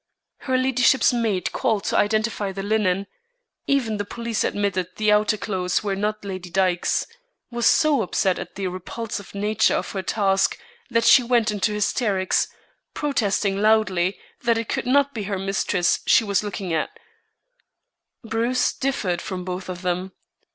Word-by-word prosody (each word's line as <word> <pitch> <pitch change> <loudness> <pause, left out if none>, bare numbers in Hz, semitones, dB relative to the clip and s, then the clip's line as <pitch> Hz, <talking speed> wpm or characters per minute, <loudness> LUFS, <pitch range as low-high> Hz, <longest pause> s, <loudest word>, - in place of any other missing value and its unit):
Her 260 -1 -1
ladyship's 255 0 +3
maid 220 -7 0
called 220 -6 0
to - - -1
identify 215 -1 +1
the 195 +1 -5
linen 200 -2 +1 0.6
even 245 -6 +1
the 205 - -2
police 230 +2 -3
admitted 200 -3 -1
the 215 -1 +2
outer 210 +1 +3
clothes 190 -2 -1
were 200 -2 -1
not 210 +1 -2
Lady 185 -2 -6
Dyke's 180 -1 +1 0.5
was 235 -1 +1
so 310 -5 +4
upset 190 -1 0
at - - -8
the 195 - -3
repulsive 200 +3 -6
nature 210 +2 +2
of - - -3
her 195 - -3
task 195 0 +1 0.3
that 230 -1 +2
she 255 - +7
went 235 -2 +2
into 210 +1 0
hysterics, 205 -2 +1 0.5
protesting 205 -8 0
loudly 205 -4 +2 0.2
that 235 -1 +2
it 230 -1 -4
could - - -2
not 280 +2 +3
be 215 -3 -4
her 200 -1 -2
mistress 190 -2 0
she - - +5
was 200 -1 0
looking 200 -4 -4
at. 160 - 0 1.3
Bruce 235 +3 0
differed 205 -11 -1
from 180 -1 -5
both 185 0 -5
of 180 0 -6
them. 180 +1 -2
205 Hz, 155 wpm, -23 LUFS, 190-230 Hz, 1.3 s, she